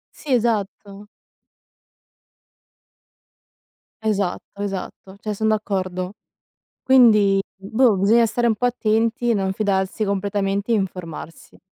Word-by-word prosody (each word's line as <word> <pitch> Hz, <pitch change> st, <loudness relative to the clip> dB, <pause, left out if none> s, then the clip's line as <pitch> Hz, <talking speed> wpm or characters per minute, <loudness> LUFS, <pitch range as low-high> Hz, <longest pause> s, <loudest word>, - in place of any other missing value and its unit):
Sì, 290 Hz, -3 st, -5 dB
esatto. 210 Hz, -3 st, -1 dB, 3.0 s
Esatto, 205 Hz, -1 st, -2 dB
esatto, 195 Hz, -1 st, -6 dB
cioè 215 Hz, -1 st, -3 dB
son 220 Hz, +2 st, -1 dB
d'accordo. 185 Hz, -3 st, -2 dB, 0.7 s
Quindi 215 Hz, -7 st, +5 dB, 0.2 s
boh, 220 Hz, +3 st, +2 dB
bisogna 225 Hz, +5 st, +4 dB
stare 240 Hz, +2 st, -1 dB
un 225 Hz, -, +3 dB
po' 245 Hz, -, 0 dB
attenti, 230 Hz, 0 st, +1 dB
non 190 Hz, -1 st, 0 dB
fidarsi 195 Hz, +1 st, -1 dB
completamente 200 Hz, +1 st, -1 dB
e -, -, +4 dB
informarsi. 180 Hz, -5 st, -5 dB
205 Hz, 95 wpm, -21 LUFS, 195-225 Hz, 3.0 s, Quindi